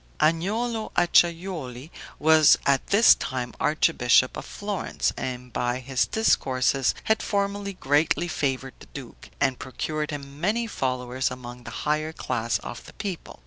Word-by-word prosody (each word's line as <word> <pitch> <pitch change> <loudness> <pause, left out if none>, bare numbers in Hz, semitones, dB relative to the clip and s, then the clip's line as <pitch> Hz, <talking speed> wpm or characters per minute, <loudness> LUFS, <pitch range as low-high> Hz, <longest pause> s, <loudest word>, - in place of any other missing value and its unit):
Agnolo 215 +8 0
Acciajuoli 170 -6 +1 0.3
was 155 -1 +6
at 140 -1 +2
this 210 +3 +7
time 125 -3 -4
archbishop 130 -5 +3
of - - -6
Florence, 205 -1 -3
and 125 -2 -5
by 120 +2 -1
his 130 0 -1
discourses 135 - +1
had 220 - +1
formerly 200 -1 -2
greatly 155 +1 +1
favored 135 -5 -2
the - - -14
duke, 135 -5 -10
and 135 -2 +1
procured 150 +3 -4
him 140 0 -7
many 220 +6 +1
followers 130 - -2
among 125 -1 -9
the - - -6 0.2
higher 155 +1 0
class 120 -5 -1
of 120 - -7
the - - -12
people. 195 -5 -6
145 Hz, 140 wpm, -25 LUFS, 130-175 Hz, 0.3 s, this